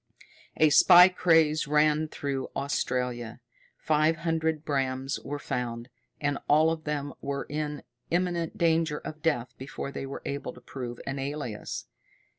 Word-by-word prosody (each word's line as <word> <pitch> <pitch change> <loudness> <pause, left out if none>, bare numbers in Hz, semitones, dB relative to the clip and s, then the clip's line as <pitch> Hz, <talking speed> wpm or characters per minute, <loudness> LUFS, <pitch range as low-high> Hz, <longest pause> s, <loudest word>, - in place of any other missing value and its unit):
A 155 -1 +5
spy 180 +3 +9
craze 160 -4 +3
ran 150 +1 +3
through 140 -3 -4
Australia. 125 -4 -2 0.4
Five 155 +1 +2
hundred 160 -1 -1
Brams 135 -1 -2
were 145 +1 -4
found, 120 -3 -4 0.3
and 145 -1 -1
all 155 +2 +5
of 160 -1 -5
them 145 -2 -3
were 140 0 -3
in 150 -1 -4 0.3
imminent 175 -1 -1
danger 165 -2 +2
of 155 +1 -8
death 125 -6 0
before 135 +1 -6
they 135 - -5
were 140 - -7
able 140 -2 -4
to 125 - -15
prove 120 -2 -7
an 135 0 -3
alias. 135 -6 -5
145 Hz, 140 wpm, -28 LUFS, 135-160 Hz, 0.4 s, spy